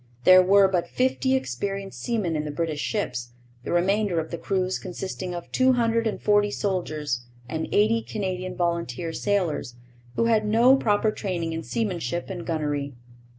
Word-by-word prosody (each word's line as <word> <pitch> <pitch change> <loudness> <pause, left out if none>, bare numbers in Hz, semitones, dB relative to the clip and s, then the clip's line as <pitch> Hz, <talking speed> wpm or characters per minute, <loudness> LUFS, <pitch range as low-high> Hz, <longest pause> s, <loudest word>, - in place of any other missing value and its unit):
There 185 +4 +8
were 195 +1 +5
but 180 -3 0
fifty 260 +1 +1
experienced 195 - -3
seamen 210 -9 -1
in 150 - -1
the 150 - -4
British 155 0 -2
ships, 125 - -3 0.3
the - - -4
remainder 190 +1 +2
of 160 - -5
the 170 - -3
crews 185 -1 -1
consisting 185 -1 -5
of 175 - -8
two 260 0 +4
hundred 230 -1 +1
and 215 - -3
forty 205 0 +3
soldiers 155 -12 -2 0.2
and 160 +4 -3
eighty 220 +2 +3
Canadian 185 -4 -4
volunteer 170 -3 -2
sailors, 180 - -1 0.4
who 230 - +2
had 225 -2 +3
no 230 +5 +5
proper 215 -4 +2
training 175 -6 -3
in 165 - -3
seamanship 175 -3 -3
and 175 -3 -6
gunnery. 145 -4 -2
185 Hz, 160 wpm, -25 LUFS, 165-210 Hz, 0.4 s, There